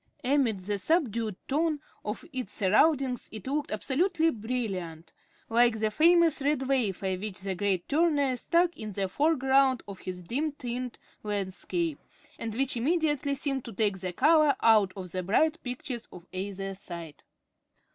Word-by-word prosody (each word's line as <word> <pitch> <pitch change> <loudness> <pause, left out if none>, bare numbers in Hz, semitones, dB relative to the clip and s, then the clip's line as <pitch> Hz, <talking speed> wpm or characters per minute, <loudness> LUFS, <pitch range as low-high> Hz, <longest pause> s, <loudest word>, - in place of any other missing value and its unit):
Amid 255 -5 +2
the 200 +2 -2
subdued 230 - 0
tone 305 +2 +1 0.2
of - - -5
its 255 -2 -4
surroundings 250 - +2
it 215 -2 -8
looked 290 +2 -2
absolutely 325 - +1
brilliant, 195 - -4 0.3
like 235 0 +4
the 215 0 +1
famous 330 +3 +4
red 285 -1 +1
wafer 205 -8 0
which 195 -1 -5
the 195 0 -2
great 185 -1 -1
Turner 290 -4 +2
stuck 340 +7 +1
in 215 -2 -6
the 195 0 -1
foreground 270 - +3
of 195 -2 -8
his 180 -1 -6
dim 285 - -2
tinted 250 -2 -5 0.2
landscape, 210 - -2 0.4
and 225 -2 -4
which 265 +1 0
immediately 295 +1 +1
seemed 275 -2 -2
to 230 - -7
take 200 -1 0
the 185 0 -3
color 305 - +4
out 215 -4 +5
of 180 -2 -7
the 185 - -2
bright 310 - +2
pictures 245 -1 -5
on 175 - -12
either 195 +1 -4
side. 170 -5 -9
240 Hz, 150 wpm, -28 LUFS, 195-290 Hz, 0.4 s, out